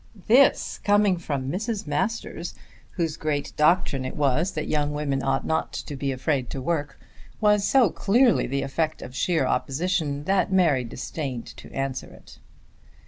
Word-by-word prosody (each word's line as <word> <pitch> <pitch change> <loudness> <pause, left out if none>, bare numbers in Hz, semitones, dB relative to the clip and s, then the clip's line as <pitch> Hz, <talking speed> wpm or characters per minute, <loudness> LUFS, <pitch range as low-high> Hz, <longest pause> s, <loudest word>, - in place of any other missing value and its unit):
This 260 +5 +4
coming 205 -2 +3
from 140 -5 -3
Mrs. 215 +3 -3
Masters, 155 +10 -3 0.4
whose 165 -4 -2
great 145 -2 -2
doctrine 150 -4 +2
it 130 - -5
was 150 +5 +1
that 155 - -3
young 150 -1 0
women 145 -2 -1
ought 135 0 0
not 160 - -1
to 145 - -5
be 135 0 -2
afraid 130 -1 -1
of 135 - -4
work, 145 -3 -2 0.4
was 210 -1 +3
so 250 -9 +4
clearly 235 +4 +3
the 140 +2 -1
effect 155 +4 -2
of 125 - -9
sheer 170 +3 +1
opposition 150 -1 -1
that 190 +3 +1
Mary 165 -9 +3
disdained 130 +1 -5
to - - -12
answer 135 -1 -3
it. - - -16
150 Hz, 155 wpm, -25 LUFS, 135-185 Hz, 0.4 s, This